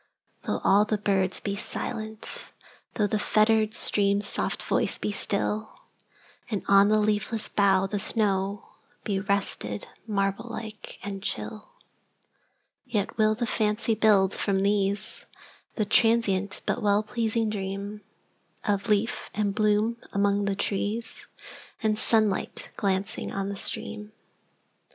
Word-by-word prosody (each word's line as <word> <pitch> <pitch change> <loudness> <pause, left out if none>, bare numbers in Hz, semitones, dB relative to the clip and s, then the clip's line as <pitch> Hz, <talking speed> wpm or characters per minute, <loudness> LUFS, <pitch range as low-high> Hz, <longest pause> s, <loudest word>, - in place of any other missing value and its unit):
Though - - -1
all 200 +2 +5
the 215 0 0
birds 195 -2 0
be 200 - -3
silent,—thoughThe 215 0 -4
fettered 215 0 +3
stream's 200 -1 +3
soft - - -1
voice - - 0
be - - -2
still, 210 +2 -2 0.7
And 210 -4 -2
on 200 +1 +6
the 215 - +4
leafless 210 +1 0
bough 195 -2 +3
the 195 +2 -2
snowBe 200 -1 -2
rested, 105 - 0 0.2
marble 200 +2 -1
like 220 -2 -7
and 195 -1 -5
chill,—Yet 230 - -7
will 215 0 +4
the 240 +2 -1
fancy 220 0 +1
build, 200 -3 +4
from 195 -1 0
these, 200 0 -1 0.5
The 215 - 0
transient 205 -3 +2
but 245 - -1
well 205 0 +3
pleasing 225 0 -1
dreamOf 200 0 -5
leaf 210 +1 0
and 205 -2 0
bloom 215 +2 +2 0.2
among 200 0 +2
the 200 -1 0
trees, 205 +3 -3 0.6
And 215 -1 +2
sunlight 215 -2 0
glancing 195 +2 -1
on 195 0 -3
the 200 - -4
stream. 210 +1 -1
210 Hz, 115 wpm, -27 LUFS, 200-215 Hz, 0.7 s, on